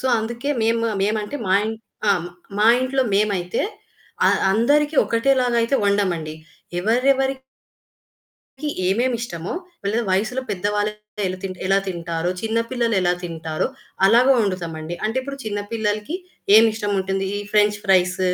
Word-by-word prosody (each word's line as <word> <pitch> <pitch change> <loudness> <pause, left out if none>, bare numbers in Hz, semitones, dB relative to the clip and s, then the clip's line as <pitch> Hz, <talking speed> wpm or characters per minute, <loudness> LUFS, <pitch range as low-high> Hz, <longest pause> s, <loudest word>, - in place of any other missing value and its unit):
So, 260 - -2
అందుకే 235 +5 -3
మేమ 230 +1 +2 0.2
మేమంటే 215 +6 -1
మా 190 - +4
ఇన్ 220 +1 -2 0.3
ఆ! - - +6 0.5
మా 210 - +4
ఇంట్లో 260 +1 +1
మేమైతే 200 -2 0 0.7
అ - - +6 0.2
అందరికి 290 +8 +2
ఒకటేలాగా 250 +1 +2
అయితే 230 +4 0
వండం 200 -1 +2
అండి. 155 -1 -6 0.5
ఎవరెవరికీ 265 +5 +1 1.3
ఏమేమిష్టమో, 230 -5 -1 0.3
వాళ్ళు 210 +4 0
వయసులో 220 +7 0
పెద్దవాళ్ళు 205 +2 0 0.4
ఎలా 185 - -3
తిన్ 190 -1 -4
ఎలా 195 +1 +4
తింటారో, 170 -1 -2
చిన్న 225 +1 0
పిల్లలు 235 -3 0
ఎలా 175 -1 +2
తింటారో, 160 -2 -3 0.4
అలాగే 240 +6 +6
వొండుతాము 185 -6 -2
అండి. 160 +2 -5
అంటే 225 +4 -1
ఇప్పుడు 275 +1 -6
చిన్న 205 -1 -2
పిల్లలకి 215 +5 -1 0.4
ఏమి 225 +1 +8
ఇష్టం 210 -1 -3
ఉంటుంది. 195 0 -1
ఈ - - -3
ఫ్రెంచ్ 210 0 +4
ఫ్రైస్, 185 -1 +3
210 Hz, 135 wpm, -22 LUFS, 190-240 Hz, 1.3 s, ఏమి